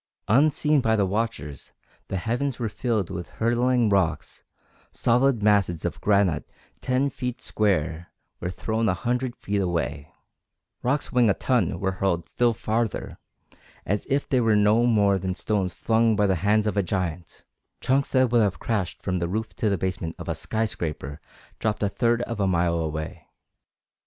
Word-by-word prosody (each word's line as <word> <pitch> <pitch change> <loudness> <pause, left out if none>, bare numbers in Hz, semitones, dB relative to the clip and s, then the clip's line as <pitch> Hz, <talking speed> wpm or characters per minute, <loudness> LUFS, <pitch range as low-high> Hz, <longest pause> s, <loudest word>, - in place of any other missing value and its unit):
Unseen 150 +4 +3
by 110 -2 +2
the 100 -2 +2
watchers, 95 -9 -3 0.3
the 95 - -3
heavens 120 +6 -1
were 120 - -2
filled 110 -2 -1
with 85 - -5
hurtling 120 +1 +2
rocks; 90 -6 0 0.5
solid 120 -1 +2
masses 100 -6 +2
of - - -3
granite 100 -7 +2 0.3
ten 130 +2 +1
feet 125 -1 -4
square 85 -5 -1 0.3
were 90 - -3
thrown 110 +4 -1
a 90 - +1
hundred 125 +5 -2
feet 100 0 -2
away; 80 -5 -2 0.7
rocks 135 +3 -1
weighing 120 -3 +4
a 100 - +3
ton 125 -3 0
were 95 -1 0
hurled 95 -3 -1
still 120 -1 +2
farther, 110 0 -2 0.7
as 105 +1 -1
if 140 +1 0
they 130 -2 +2
were 110 -2 +3
no 105 +3 +4
more 100 -4 +3
than 95 0 -3
stones 100 -4 -1
flung 115 +2 +2
by 105 0 +2
the 95 -2 +2
hands 105 +2 +3
of 105 - -1
a 100 - +3
giant; 90 -3 -4 0.3
chunks 135 +2 +1
that 130 -2 +3
would 120 -1 +4
have 100 -3 +1
crashed 105 -6 -3
from 90 -2 -1
the 85 - -1
roof 110 +4 -3
to 110 - 0
the 100 - +1
basement 85 -2 -3
of - - -8
a - - 0
skyscraper 80 -9 -3 0.4
dropped 105 -1 -1
a 100 - +2
third 120 +2 +1
of 115 -3 -5
a 100 - +2
mile 85 -2 +1
away. 80 -1 -4
105 Hz, 170 wpm, -25 LUFS, 90-120 Hz, 0.7 s, weighing